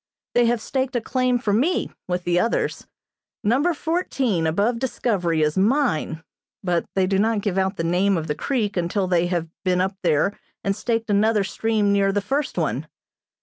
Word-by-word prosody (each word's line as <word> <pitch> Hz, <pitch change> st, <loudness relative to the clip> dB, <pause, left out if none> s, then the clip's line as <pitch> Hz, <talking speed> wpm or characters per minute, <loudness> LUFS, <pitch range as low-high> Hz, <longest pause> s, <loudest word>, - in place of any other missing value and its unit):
They 240 Hz, -1 st, +4 dB
have 235 Hz, -1 st, +1 dB
staked 265 Hz, +1 st, -2 dB
a -, -, +3 dB
claim 255 Hz, +1 st, +1 dB
for 215 Hz, -4 st, -1 dB
me, 280 Hz, -, +1 dB, 0.2 s
with 180 Hz, 0 st, -2 dB
the 175 Hz, 0 st, +2 dB
others. 230 Hz, -, -1 dB, 0.6 s
Number 265 Hz, +11 st, +3 dB
Fourteen, 275 Hz, -, 0 dB
above 205 Hz, +9 st, +1 dB
Discovery, 190 Hz, -10 st, 0 dB
is 150 Hz, +4 st, +1 dB
mine, 200 Hz, -, +1 dB, 0.4 s
but 175 Hz, -2 st, 0 dB
they 190 Hz, -1 st, +3 dB
do 190 Hz, +1 st, +1 dB
not 220 Hz, 0 st, +2 dB
give 195 Hz, -2 st, 0 dB
out 190 Hz, 0 st, 0 dB
the 165 Hz, -, -1 dB
name 180 Hz, +3 st, +2 dB
of 160 Hz, -, -3 dB
the 150 Hz, -, -1 dB
creek 215 Hz, -, -1 dB
until 180 Hz, +2 st, 0 dB
they 175 Hz, -1 st, +2 dB
have 175 Hz, -2 st, -1 dB, 0.2 s
been 180 Hz, -2 st, +2 dB
up 190 Hz, +1 st, 0 dB
there 175 Hz, +4 st, +2 dB, 0.3 s
and 195 Hz, 0 st, 0 dB
staked 225 Hz, 0 st, -1 dB
another 210 Hz, +1 st, +3 dB
stream 210 Hz, 0 st, 0 dB
near 200 Hz, -1 st, +3 dB
the 205 Hz, -, +1 dB
first 270 Hz, +8 st, -2 dB
one. -, -, -1 dB
200 Hz, 185 wpm, -23 LUFS, 180-235 Hz, 0.6 s, They